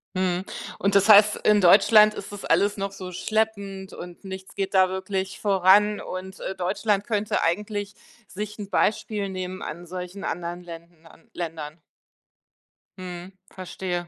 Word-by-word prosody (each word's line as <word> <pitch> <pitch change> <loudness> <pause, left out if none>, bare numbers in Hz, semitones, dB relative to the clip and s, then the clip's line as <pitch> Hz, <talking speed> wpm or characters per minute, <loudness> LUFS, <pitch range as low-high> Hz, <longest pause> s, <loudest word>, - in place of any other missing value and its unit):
Mhm. 185 0 0 0.3
Und 200 0 0
das 200 +2 +4
heißt, 210 0 +8
in 210 -1 +3
Deutschland 210 +3 +6
ist 200 - -8
das 205 - -8
alles 205 +1 +2
noch 195 0 -3
so 185 -2 -8
schleppend 200 -1 -2
und 175 +2 -10
nichts 190 0 -8
geht 195 0 -3
da 185 0 +6
wirklich 190 0 -4
voran 200 +1 +4
und, 185 +1 -7
äh, 190 - -4
Deutschland 200 +2 0
könnte 210 -2 0
eigentlich 205 +4 -2 0.3
sich 210 +2 -7
'n 200 -1 -6
Beispiel 205 0 0
nehmen 185 0 -5
an 170 +3 -7
solchen 180 +2 -7
anderen 175 +1 -4
Länden 170 -1 -12
an 165 - -20
Ländern. 160 -2 -6 1.2
Mhm, 180 0 -8 0.2
verstehe. 180 -1 -5
190 Hz, 150 wpm, -25 LUFS, 180-205 Hz, 1.2 s, heißt